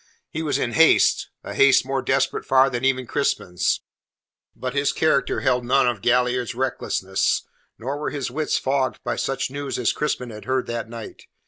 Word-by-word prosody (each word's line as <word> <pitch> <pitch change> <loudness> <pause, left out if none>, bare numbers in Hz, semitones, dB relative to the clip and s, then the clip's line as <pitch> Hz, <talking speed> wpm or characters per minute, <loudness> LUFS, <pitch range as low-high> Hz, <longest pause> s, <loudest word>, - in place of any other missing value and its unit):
He 160 - -3
was 155 -2 0
in 120 - -1
haste 165 +4 +4
a - - -6
haste 140 -2 +5
more 135 0 -1
desperate 135 0 0
far 135 0 +4
than 120 +1 -3
even 130 -1 +1
Crispin's. 110 -10 0 0.7
But 125 -1 -4
his 140 0 +1
character 155 -3 +1
held 125 -1 +1
none 130 +1 +3
of 120 -5 -1
Galliard's 125 0 +1
recklessness, 120 -7 -1 0.3
nor 135 +5 -4
were 150 - -2
his 140 -4 -4
wits 155 +3 0
fogged 135 -1 0
by - - -2
such 135 -1 -2
news 140 -1 -4
as 125 - +1
Crispin 125 -5 -2
had 105 -1 -10
heard 130 0 0
that 115 -1 -4
night. 115 -2 -9
130 Hz, 180 wpm, -23 LUFS, 120-140 Hz, 0.7 s, haste